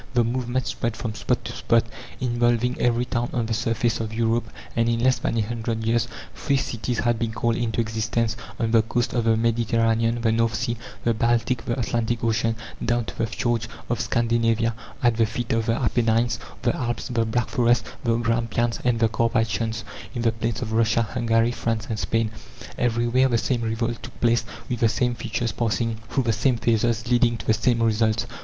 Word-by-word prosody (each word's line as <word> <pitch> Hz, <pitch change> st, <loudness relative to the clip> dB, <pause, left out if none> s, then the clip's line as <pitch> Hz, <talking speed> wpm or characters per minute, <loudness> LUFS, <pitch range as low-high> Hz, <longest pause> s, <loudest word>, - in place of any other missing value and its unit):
The 120 Hz, -, +5 dB
movement 125 Hz, +1 st, -1 dB
spread 115 Hz, -1 st, -2 dB
from 115 Hz, -2 st, -3 dB
spot 105 Hz, -, -1 dB
to -, -, -4 dB
spot, 115 Hz, 0 st, +2 dB, 0.3 s
involving 120 Hz, 0 st, +1 dB
every 120 Hz, 0 st, +2 dB
town 120 Hz, -1 st, -1 dB
on 120 Hz, -2 st, 0 dB
the 115 Hz, -, -2 dB
surface 115 Hz, 0 st, 0 dB
of 110 Hz, -1 st, -3 dB
Europe, 115 Hz, 0 st, 0 dB, 0.3 s
and 115 Hz, 0 st, +2 dB
in 115 Hz, 0 st, +1 dB
less 130 Hz, 0 st, +3 dB
than 115 Hz, -, -1 dB
a -, -, +3 dB
hundred 115 Hz, 0 st, -3 dB
years 115 Hz, +1 st, +2 dB, 0.3 s
free 140 Hz, -, 0 dB
cities 120 Hz, -2 st, -2 dB
had 120 Hz, 0 st, +1 dB
been 115 Hz, -1 st, -1 dB
called 115 Hz, +1 st, 0 dB
into 115 Hz, 0 st, 0 dB
existence 110 Hz, 0 st, -1 dB, 0.2 s
on 115 Hz, -1 st, 0 dB
the 115 Hz, -1 st, +6 dB
coasts 120 Hz, +2 st, -1 dB
of 120 Hz, -2 st, 0 dB
the 115 Hz, -1 st, +4 dB
Mediterranean, 115 Hz, 0 st, +2 dB
the 115 Hz, -1 st, +2 dB
North 115 Hz, +1 st, +1 dB
Sea, 120 Hz, 0 st, -1 dB, 0.3 s
the 120 Hz, -, +2 dB
Baltic, 115 Hz, +2 st, +1 dB
the 120 Hz, +3 st, -1 dB
Atlantic 120 Hz, -1 st, -1 dB
Ocean, 115 Hz, 0 st, +1 dB, 0.3 s
down 120 Hz, -1 st, +1 dB
to -, -, -7 dB
the 115 Hz, -, 0 dB
fjords 115 Hz, 0 st, -1 dB, 0.2 s
of 120 Hz, -, 0 dB
Scandinavia; 115 Hz, 0 st, +1 dB, 0.3 s
at 120 Hz, -2 st, +3 dB
the 115 Hz, -1 st, +3 dB
feet 120 Hz, +1 st, -3 dB
of 115 Hz, -1 st, 0 dB
the 115 Hz, -, +1 dB
Apennines, 115 Hz, -1 st, +1 dB, 0.2 s
the -, -, +2 dB
Alps, 120 Hz, 0 st, -3 dB
the 120 Hz, -2 st, +1 dB
Black 115 Hz, +2 st, -1 dB
Forest, 120 Hz, -2 st, +2 dB, 0.2 s
the 115 Hz, -2 st, +2 dB
Grampians, 115 Hz, 0 st, 0 dB
and 125 Hz, -2 st, +2 dB
the 115 Hz, -, +4 dB
Carpathians; 110 Hz, -1 st, 0 dB, 0.3 s
in 120 Hz, -, -2 dB
the 115 Hz, -, +4 dB
plains 115 Hz, +1 st, -2 dB
of 110 Hz, -, -5 dB
Russia, 115 Hz, +1 st, +3 dB
Hungary, 115 Hz, 0 st, +1 dB
France 115 Hz, -2 st, -2 dB
and 110 Hz, -, -2 dB
Spain. 115 Hz, 0 st, 0 dB, 0.4 s
Everywhere 120 Hz, +2 st, +2 dB
the 120 Hz, -, +2 dB
same 120 Hz, +1 st, 0 dB
revolt 115 Hz, +1 st, -2 dB
took 120 Hz, +2 st, -11 dB
place, 115 Hz, -1 st, +2 dB, 0.2 s
with 125 Hz, -3 st, -2 dB
the 115 Hz, -, +4 dB
same 120 Hz, +2 st, +1 dB
features, 115 Hz, 0 st, -2 dB
passing 115 Hz, +1 st, -1 dB
through 135 Hz, -, +1 dB
the 115 Hz, -2 st, +1 dB
same 125 Hz, +2 st, +2 dB
phases, 115 Hz, 0 st, +1 dB
leading 120 Hz, -1 st, +3 dB
to 105 Hz, -, -9 dB
the 110 Hz, -, +4 dB
same 115 Hz, +1 st, +2 dB
results. 110 Hz, 0 st, +2 dB
115 Hz, 200 wpm, -24 LUFS, 115-120 Hz, 0.4 s, the